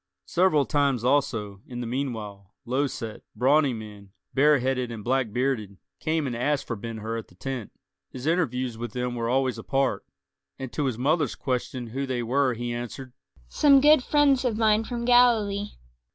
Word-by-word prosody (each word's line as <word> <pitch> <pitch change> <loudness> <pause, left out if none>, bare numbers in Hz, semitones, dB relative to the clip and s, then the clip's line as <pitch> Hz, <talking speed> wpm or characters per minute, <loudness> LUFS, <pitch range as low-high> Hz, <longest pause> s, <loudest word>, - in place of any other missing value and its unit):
Several 160 - +3
times 140 -5 +1
also, 115 -7 0
in 120 -1 -7
the 120 - -3
meanwhile, 110 -6 -5
low 130 +4 +1
set, 115 -4 -7
brawny 140 +5 +3
men, 105 -3 -9 0.2
bareheaded 130 -3 +2
and 110 -3 -7
black 125 -1 0
bearded, 115 -5 -1 0.2
came 155 -1 0
and 125 -3 -3
asked 145 +4 0
for 115 - -3
Ben 115 +2 -6
Hur 110 +1 -4
at 110 - -10
the - - -21
tent; 125 +2 -5 0.4
his 130 +1 -8
interviews 130 -8 0
with 120 -2 -5
them 125 0 -2
were 115 -1 -2
always 130 0 +1
apart; 135 -7 0 0.5
and 130 -2 -7
to 150 - -1
his 130 -4 -1
mother's 145 +1 +1
question 125 -1 -3
who 135 +4 -4
they 125 -2 -2
were 130 +1 +1
he 120 +1 -3
answered, 120 +2 -6 0.3
"Some 280 - +5
good 295 -1 +6
friends 280 -3 +3
of 235 -4 0
mine 220 0 +3
from 235 0 -4
Galilee." 225 -5 +4
130 Hz, 175 wpm, -26 LUFS, 115-150 Hz, 0.5 s, good